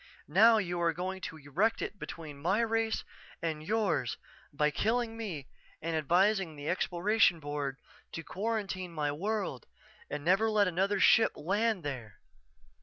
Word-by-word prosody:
Now 220 - +6
you 175 -4 -1
are 170 -1 +2
going 185 +3 -4
to 160 - -11
erect 155 +10 0
it 205 - -5
between 150 -4 -8
my 190 +8 +2
race 225 -1 0 0.4
and 160 -3 -3
yours 190 - 0 0.3
by 150 +1 +1
killing 225 +5 0
me 185 -12 -5 0.3
and 165 +1 -2
advising 175 +2 +2
the 145 0 -7
Exploration 180 +1 +2
Board 145 -2 -3 0.4
to 165 - -5
quarantine 195 -2 -3
my 150 -2 -1
world 190 - -3 0.4
and 150 0 -5
never 195 +6 +4
let 210 -2 +3
another 195 +3 +1
ship 225 +3 +5
land 200 +4 0
there. 120 -9 -6
180 Hz, 145 wpm, -31 LUFS, 150-215 Hz, 0.4 s, Now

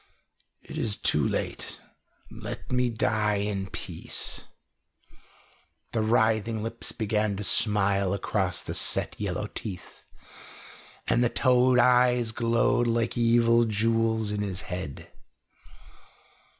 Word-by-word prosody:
"It - - -7
is 105 -3 0
too 75 -2 +2
late. - - -3 0.5
Let - - -8
me 125 -1 +1
die 105 -2 0
in 100 -1 -2
peace." - - -2 1.5
The 115 - 0
writhing 110 0 +1
lips 115 +1 -2
began 105 -2 -1
to 105 - -5
smile 100 -2 +2
across 100 - -1
the - - -5
set - - 0
yellow - - -2
teeth, 95 -5 -8 1.0
and 120 - +2
the 120 - +2
toad 125 0 +3
eyes 125 -1 +4
glowed 115 +1 +1
like 115 0 0
evil 115 0 +3
jewels 110 0 +1
in 105 0 -2
his 95 -3 -3
head. 90 -6 -7
110 Hz, 110 wpm, -27 LUFS, 105-115 Hz, 1.5 s, eyes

